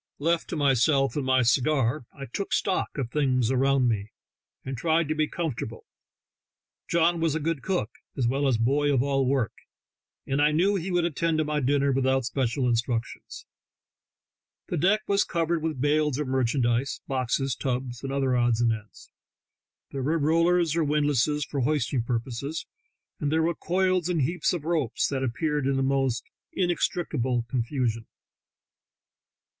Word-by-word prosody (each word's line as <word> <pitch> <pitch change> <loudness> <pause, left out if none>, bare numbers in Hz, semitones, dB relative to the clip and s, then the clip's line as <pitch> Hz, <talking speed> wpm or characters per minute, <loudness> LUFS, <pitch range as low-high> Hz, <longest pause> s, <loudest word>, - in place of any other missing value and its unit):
Left 165 +3 0
to - - -3
myself 135 0 +2
and 145 - -1
my 130 -1 +3
cigar, 130 +1 +1
I 140 -2 -8
"took 195 - -4
stock" 190 -5 0
of 125 -4 -3
things 130 -5 +1
around 135 0 +3
me, 105 -3 -1 0.6
and 135 - -4
tried 160 +4 +1
to - - +2
be 155 0 0
comfortable. 140 -10 -4 1.0
John 170 0 +2
was 165 -2 +1
a - - 0
good 160 -2 -2
cook, 180 - -1 0.3
as 125 -3 +1
well 135 +3 +1
as 125 -4 +2
boy 140 +6 +2
of 135 -2 +2
all 135 -2 +1
work, 130 -6 +1 0.7
and 135 +1 0
I 150 +1 +4
knew 185 +6 +3
he 190 0 -3
would 175 -2 +1
attend 165 0 0
to 155 - +2
my 150 0 -1
dinner 140 +1 +2
with 130 0 +1
out 130 -1 +2
special 125 +1 0
instructions. 120 0 -2 1.2
The - - -1
deck 200 +7 +3
was 200 0 +2
covered 170 -1 -1
with 155 -4 -3
bales 150 0 +1
of 150 -2 -2
merchandise, 125 0 0
boxes, 130 0 -1
tubs, 125 -2 -3
and 135 - -4
other 135 -2 +1
odds 120 -2 +2
and 120 -1 +3
ends; 105 -1 -10 0.8
there 135 - -4
were 155 +5 +1
rollers 165 +1 +2
or 165 - +2
windlasses 150 -1 +1
for 140 - -4
hoisting 140 -1 0
purposes; 120 +6 -3 0.5
and 145 -1 -1
there 160 +1 +2
were 170 +1 +1
coils 185 +1 0
and 165 -5 +1
heaps 170 +7 0
of 170 -4 -4
ropes 155 -8 0
that 135 -2 -2
appeared 145 +3 -1
in 135 - +1
the 135 - +1
most 135 -3 0 0.3
inextri 175 -1 0
cable 125 -4 -1
confusion. 115 -2 -2
140 Hz, 165 wpm, -26 LUFS, 125-160 Hz, 1.2 s, I